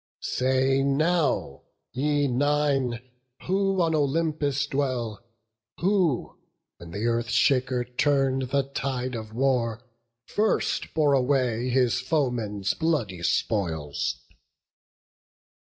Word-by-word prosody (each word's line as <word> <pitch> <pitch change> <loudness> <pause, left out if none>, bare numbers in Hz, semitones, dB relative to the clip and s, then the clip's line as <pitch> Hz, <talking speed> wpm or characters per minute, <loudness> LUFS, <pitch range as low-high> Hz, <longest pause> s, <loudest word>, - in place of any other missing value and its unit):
Say 130 +1 +1
now, 145 - +1 0.3
ye 145 +2 +1
Nine, 135 -2 0 0.4
who 195 +1 +1
on 165 -1 +1
Olympus 145 -1 0
dwell, 130 -6 -2 0.6
Who, 180 - +1 0.4
when 85 -1 -11
th' - - -9
Earth 115 0 0
shaker 125 0 +2
turn'd 135 0 +1
the 140 +1 +2
tide 130 -1 -3
of 110 -2 -6
war, 120 -1 0 0.4
First 215 +1 0
bore 150 -3 +3
away 125 -3 +1
his 125 -1 +2
foeman's 120 -8 -1
bloody 140 - -1
spoils? 80 -7 -1
130 Hz, 95 wpm, -26 LUFS, 120-145 Hz, 0.6 s, bore